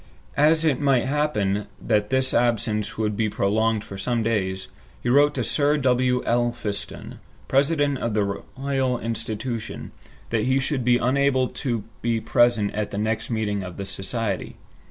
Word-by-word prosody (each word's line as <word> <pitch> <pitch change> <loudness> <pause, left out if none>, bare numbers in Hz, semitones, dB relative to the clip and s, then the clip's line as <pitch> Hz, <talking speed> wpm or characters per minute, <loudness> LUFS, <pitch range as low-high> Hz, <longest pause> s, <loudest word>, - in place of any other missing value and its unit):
As 155 +2 +4
it 145 -5 +2
might 135 -4 +3
happen 115 -9 0
that 105 -1 +1
his 130 0 +1
absence 115 -3 0
would 105 -1 0
be 110 0 0
prolonged 110 +2 +1
for 100 - -9
some 120 +2 0
days, 95 -4 -1 0.3
he 120 - -2
wrote 145 +3 +4
to 125 - 0
Sir 145 +6 +2
W. 125 -2 +2
Elphiston, 120 -4 -2 0.3
President 140 0 +2
of 115 -2 -2
the 105 - +3 0.3
Royal 135 -2 0
Institution, 115 0 -4 0.4
that 115 -2 +1
he 130 +1 +2
should 135 -1 -1
be 120 0 +4
unable 130 +1 +2
to 120 -6 -3 0.2
be 115 -1 +1
present 120 -3 +2
at 105 0 -2
the 100 - -5
next 110 +1 -1
meeting 105 -3 -1
of 90 -2 -8
the 100 - -4
Society. 100 +1 -3
120 Hz, 155 wpm, -24 LUFS, 105-130 Hz, 0.4 s, As